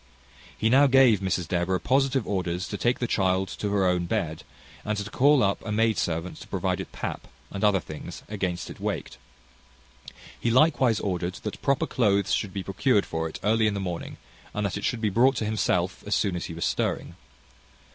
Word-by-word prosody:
He 110 - +1
now 135 +5 +6
gave 130 -6 +5
Mrs 95 -3 -1
Deborah 90 +2 0
positive 135 +2 +1
orders 90 -1 -2
to - - -4
take 120 +4 +1
the 125 - -1
child 95 -3 +1
to 105 - -3
her 100 -1 +2
own 90 -1 +1
bed, 80 -2 -2 0.4
and 105 0 -2
to 100 0 -3
call 140 -1 +4
up 100 0 0
a 110 - -4
maid 110 +1 +2
servant 85 +1 -2
to - - -11
provide - - -1
it - - -6
pap, - - -5 0.2
and 100 - -5
other 105 -2 +4
things, 75 -3 -9
against 95 -4 -3
it - - -11
waked. - - -4 1.2
He 120 - 0
likewise 130 -3 +4
ordered 90 -2 -2
that 105 - -5
proper 140 -1 +1
cloathes 100 -5 +1
should 100 - 0
be 95 0 -4
procured 100 +3 +1
for 80 0 -3
it - - -8
early 110 +1 +3
in 105 - 0
the - - -2
morning, 90 -3 -5 0.4
and 105 0 -1
that 100 - -2
it 105 - -5
should 120 - -1
be 110 - +2
brought 130 +6 +4
to 110 - -2
himself 95 -4 0
as 105 - +1
soon 100 -4 0
as 85 - -3
he 85 - -7
was 85 - -2
stirring. - - -1
100 Hz, 205 wpm, -26 LUFS, 90-115 Hz, 1.2 s, now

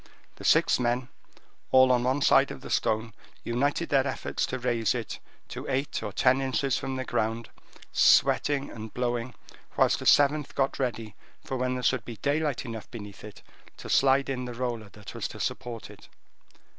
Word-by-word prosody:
The - - -11
six - - +4
men, 125 +1 0 0.6
all 130 0 +6
on 125 -1 +2
one 130 +3 +1
side - - +5
of - - -8
the - - -9
stone, 110 +1 0 0.3
united 140 +8 0
their 140 -1 +3
efforts 130 - -2
to 130 - -3
raise 120 -2 0
it 115 -3 -5 0.3
to - - -7
eight 135 +2 -1
or 105 -2 -4
ten 130 +6 +3
inches 135 0 0
from 135 - -3
the 130 0 -3
ground, 115 0 -2 0.4
sweating 140 -1 +3
and 110 -1 -8
blowing, 120 0 -2 0.4
whilst - - +3
a - - -3
seventh 145 0 +4
got 135 0 0
ready 115 -5 -3 0.3
for 135 - -3
when 130 0 -1
there 125 - -4
should 130 -1 +1
be 120 - -8
daylight 145 0 -1
enough 115 -3 -7
beneath 105 -4 -10
it 105 -1 -11 0.3
to - - -9
slide 135 0 +4
in 125 -2 -3
the 120 -1 -6
roller 120 -4 -3
that 105 -1 -11
was - - -3
to - - -11
support 120 -3 -4
it. - - -16
125 Hz, 180 wpm, -27 LUFS, 115-135 Hz, 0.6 s, all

